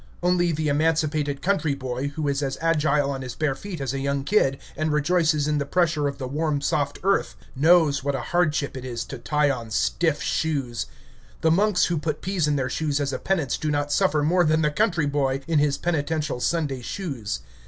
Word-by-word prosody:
Only 175 -1 +2
the 155 -1 -1
emancipated 150 -1 0
country 180 -7 +1
boy, 130 0 -3
who 145 +1 -3
is 140 0 0
as 135 -1 -2
agile 150 -3 +2
on 135 -1 -4
his 130 -2 -6
bare 155 -3 0
feet 180 +4 -7
as 135 -2 -2
a 135 - -2
young 140 0 -1
kid, 135 -6 +2 0.2
and 155 +1 -1
rejoices 155 0 +2
in 150 -1 +1
the 140 - -1
pressure 160 -3 +1
of 140 -1 -4
the 130 -2 -4
warm 150 +2 -1
soft 145 0 -1
earth, 195 +1 +1 0.2
knows 155 -1 +4
what 140 0 0
a - - -2
hardship 155 -5 +1
it 130 - -6
is 120 -2 -4
to 135 - -8
tie 150 +3 +1
on 120 -4 -5
stiff 150 - +1
shoes. 135 -8 -1 0.5
The 160 - +3
monks 200 +2 +3
who 170 -3 -1
put 155 -1 -3
peas 185 -5 0
in 150 - +1
their 130 -2 0
shoes 145 +1 -1
as 140 -1 -1
a - - -2
penance 160 -10 -1
do 155 - -1
not 145 0 -1
suffer 155 -3 +2
more 175 +4 +3
than 155 0 +2
the 150 - +2
country 175 -3 +1
boy 140 -2 0
in 165 -2 +2
his 145 -1 +2
penitential 155 -4 -1
Sunday 145 -3 -1
shoes. 135 - -4
150 Hz, 210 wpm, -24 LUFS, 140-165 Hz, 0.5 s, knows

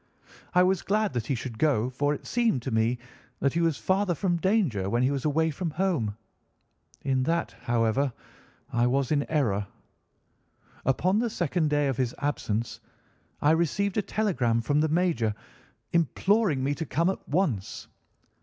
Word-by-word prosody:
I 180 - +7
was 185 0 +2
glad 210 +1 0
that 120 -3 -2
he 135 - 0
should 115 -1 -6
go, 130 -6 +2
for 145 +3 0
it - - -11
seemed 230 - +1
to 130 - -3
me 110 +2 +2 0.4
that 140 - +1
he 170 - +1
was 165 -4 +1
farther 190 -1 +1
from 175 0 0
danger 165 - +1
when 120 +4 +1
he 130 - +2
was 140 -1 -2
away 160 +2 +2
from 165 +3 -3
home. 155 - -1 0.9
In 130 -2 +1
that, 165 +5 -1
however, 120 +3 +1 0.6
I 120 0 +3
was 135 +2 0
in 145 -2 +1
error. 105 -10 +1 1.2
Upon 180 +10 +2
the 235 0 0
second 170 -4 0
day 145 -1 +2
of 135 -3 -1
his 125 -3 -1
absence 115 -6 -2 0.6
I 145 - +5
received 170 +5 +1
a - - +4
telegram 160 - 0
from 145 +6 +1
the 155 - +1
major, 155 - +1 0.6
imploring 170 -1 +2
me 140 +2 +1
to 160 +2 -4
come 170 +7 +2
at - - -9
once. 145 - -1
145 Hz, 165 wpm, -27 LUFS, 125-180 Hz, 1.2 s, I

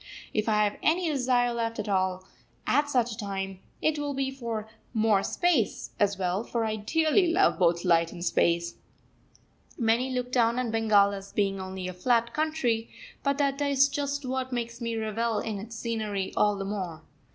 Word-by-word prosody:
If 215 +1 0
I 210 -1 +3
have 205 0 -1
any 340 +3 +2
desire 250 -3 +2
left 230 -1 -2
at 210 - -3
all 185 -2 0 0.4
at 290 0 +2
such 245 -4 +1
a 215 - -6
time, 195 -3 -4 0.2
it 310 -1 +2
will 290 -1 -2
be 270 0 -1
for 230 -5 -4 0.3
"more 215 -3 +3
space" 325 - 0
as 200 -1 +2
well; 185 +2 -1
for 235 -1 -2
I 215 0 -1
dearly 320 - +2
love 375 - +3
both 170 0 +2
light 170 -1 +3
and 175 0 -6
space. 170 -1 +1 1.0
Many 235 +2 +2
look 250 -1 -2
down 235 -1 +3
on 250 -3 -1
Bengal 215 -3 +4
as 195 0 -7
being 195 -2 0
only 185 0 -5
a 185 - -5
flat 235 +5 +1
country, 300 -8 0 0.3
but 280 0 0
that 280 -1 0
is 280 -1 +4
just 280 0 -3
what 260 0 -2
makes 235 0 -4
me 230 -1 -2
revel 220 +1 -1
in 210 -1 -3
its 225 +3 -8
scenery 215 -4 -3
all 210 -1 +3
the 195 0 -4
more. 185 -5 -4
225 Hz, 185 wpm, -28 LUFS, 200-260 Hz, 1.0 s, Bengal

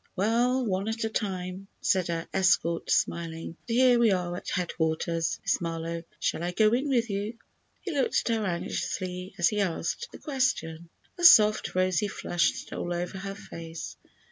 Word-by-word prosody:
"Well, 240 +6 +2
one 195 -1 -1
at 225 +1 -2
a 220 - 0
time," 190 -2 -3
said 185 -2 +1
her 165 -1 -3
escort, 185 -3 +2
smiling; 165 -1 -1
"but 230 - -2
here 250 -1 +5
we 235 -2 +5
are 180 -2 0
at - - -6
headquarters, 165 -1 -1
Miss - - +1
Marlowe. 165 0 -3 0.2
Shall - - -1
I 175 +1 -2
go 215 +3 +4
in 265 +4 +1
with 240 -3 +2
you?" 205 +4 -3 0.4
He 370 - -4
looked 280 -4 +1
at 230 - +2
her - - -2
anxiously 180 0 -3
as 175 -2 +4
he 210 -1 0
asked 185 - -2
the - - -10
question. 245 - -1 0.3
A - - -4
soft, 215 - +7
rosy 185 +3 +2
flush 175 -3 0
stole 175 - -5
over 175 +2 -4
her 195 0 -5
face. 165 -4 -8
190 Hz, 170 wpm, -28 LUFS, 170-225 Hz, 0.4 s, soft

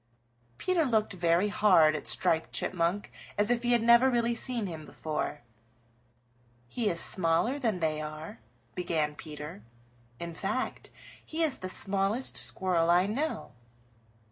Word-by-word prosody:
Peter 365 -3 +1
looked 220 -6 +1
very 175 +2 +2
hard 180 -7 +4
at 150 - -6
Striped 160 0 +1
Chipmunk 175 +3 -1 0.3
as 205 +3 +2
if 240 -1 +1
he 240 0 0
had 235 -1 +2
never 235 +3 +6
really 235 -1 +1
seen 235 -1 +1
him 160 -4 -6
before. 150 -2 -4 1.2
"He 220 - -1
is 170 - +1
smaller 185 +12 +3
than 220 -9 -1
they 155 -1 0
are," 155 -3 -7 0.3
began 160 -4 -1
Peter. 150 -6 -9 0.6
"In 170 0 -6
fact, 195 +9 -3 0.3
he 325 +1 -3
is 305 -4 0
the 185 - -5
smallest 195 +6 0
Squirrel 175 -3 0
I 175 +2 +4
know." 275 +10 -3
190 Hz, 140 wpm, -29 LUFS, 165-235 Hz, 1.2 s, never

